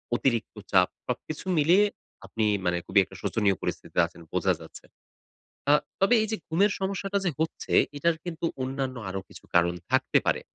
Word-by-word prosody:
অতিরিক্ত 115 -3 0 0.2
চাপ। 90 -2 +5 0.2
সবকিছু 145 +7 -4
মিলিয়ে 175 +8 +5 0.4
আপনি 110 -1 -1 0.2
মানে 90 0 +2
খুবই 100 +1 +4
একটা 95 0 -13
শোচনীয় 100 -4 +1
পরিস্থিতিতে - - -3
আছেন 85 - -16
বোঝা - - +2
যাচ্ছে। - - -12 0.9
আ - - +7 0.3
তবে 195 +5 +5
এই 220 - -2
যে 220 - +1
ঘুমের 195 +6 +3
সমস্যাটা 195 +1 -1
যে 175 - +2
হচ্ছে, 160 +1 -3 0.2
এটার 165 +3 +2
কিন্তু 170 -1 -5 0.2
অন্যান্য 130 -1 -3
আরো 95 +1 -3
কিছু - - -14
কারণ 85 0 +4 0.2
থাকতে - - +3
পারে। - - +2
135 Hz, 165 wpm, -27 LUFS, -, 0.9 s, আ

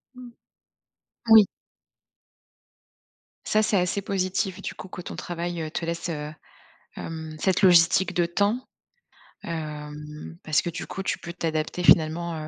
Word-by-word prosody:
Mmh. 250 -1 -11 1.0
Oui. 220 -2 +9 2.0
Ça 215 - +3
c'est 210 -2 +2
assez 180 +2 0
positif 190 0 -1
du - - -5
coup 185 - -10
que 180 - -7
ton - - -7
travail, 175 -1 -4
heu, 155 - -4
te 170 - -3
laisse, 170 +1 -3
heu, 150 -1 -4 0.6
hem, 160 -1 -6
cette 190 0 +1
logistique 180 0 +5
de 175 - +3
temps. 205 +8 0 0.8
Hem, 150 - -6
parce 155 -1 +2
que - - -3
du 170 - -6
coup 195 - -4
tu - - -1
peux 170 - -7
t'adapter 160 0 -2
finalement, 165 +1 +4
170 Hz, 140 wpm, -25 LUFS, 155-190 Hz, 2.0 s, Oui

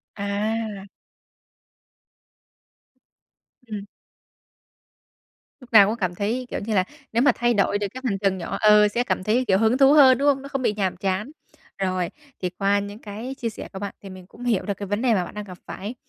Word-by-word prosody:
À! 205 0 -3 2.8
Ừm. 210 -2 -6 1.8
Lúc 250 - -15
nào 200 -3 +9
cũng 220 - -1
cảm 185 -5 -2
thấy, 225 +7 -2
kiểu, - - -3
như 215 +1 -3
là 185 - +4 0.3
nếu 230 - +3
mà 275 - +6
thay 240 0 +2
đổi 205 -1 +2
được 205 -1 -2
cái 260 - -7
hành 205 -6 0
trình 195 -2 +1
nhỏ 170 - -4
ờ, 210 0 +6
sẽ 235 +4 -1
cảm 245 - -2
thấy 235 +6 +1
kiểu 190 -2 +4
hứng 225 +4 +3
thú 275 +1 +6
hơn, 265 -4 +7
đúng 280 - +1
hông? 275 -2 +3
Nó 275 - -8
không 275 -2 -3
bị 230 - +1
nhàm 190 -3 -1
chán. 195 +7 -2 0.5
Rồi, 185 -2 -1 0.3
thì 180 - -1
qua 200 +3 +1
những 205 +1 -7
cái 225 +5 -7
chia 230 - -2
sẻ 215 - -8
của 190 - -6
bạn 200 0 -5
thì 195 - -10
mình 185 -1 -11
cũng 230 +5 -13
hiểu 230 -6 +1
được 205 - -1
cái 200 -1 -6
vấn 205 +2 -1
đề 245 -2 +3
mà 185 -4 +1
bạn - - -10
đang 210 0 -5
gặp 185 -3 -11
phải. 205 +6 -6
210 Hz, 210 wpm, -23 LUFS, 195-240 Hz, 2.8 s, nào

